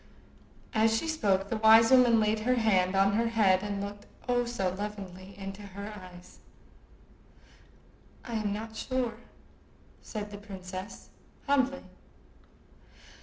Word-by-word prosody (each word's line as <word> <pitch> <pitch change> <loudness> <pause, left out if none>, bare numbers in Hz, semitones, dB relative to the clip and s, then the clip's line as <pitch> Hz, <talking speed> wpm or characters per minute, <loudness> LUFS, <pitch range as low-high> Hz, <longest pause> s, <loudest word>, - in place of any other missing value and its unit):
As 225 0 +3
she 325 - -3
spoke, 200 -11 +1
the 225 - 0
wise 225 +1 +7
woman 245 -3 +6
laid 215 0 +1
her 250 +4 +1
hand 195 -5 +2
on 195 +1 +4
her 230 +2 +2
head 205 -5 +3
and 200 -1 -3
looked—oh, 205 +4 -3
so 195 -6 -1
lovingly!—into 195 0 -7
her 200 +1 -8
eyes. 180 -2 -13 1.9
"I 235 - -6
am 215 -2 -1
not 220 +2 -5
sure," 240 -1 -2 0.8
said 210 -1 -6
the 205 - -8
princess, 190 -1 -8 0.4
humbly. 275 -1 +1
210 Hz, 120 wpm, -29 LUFS, 195-230 Hz, 1.9 s, wise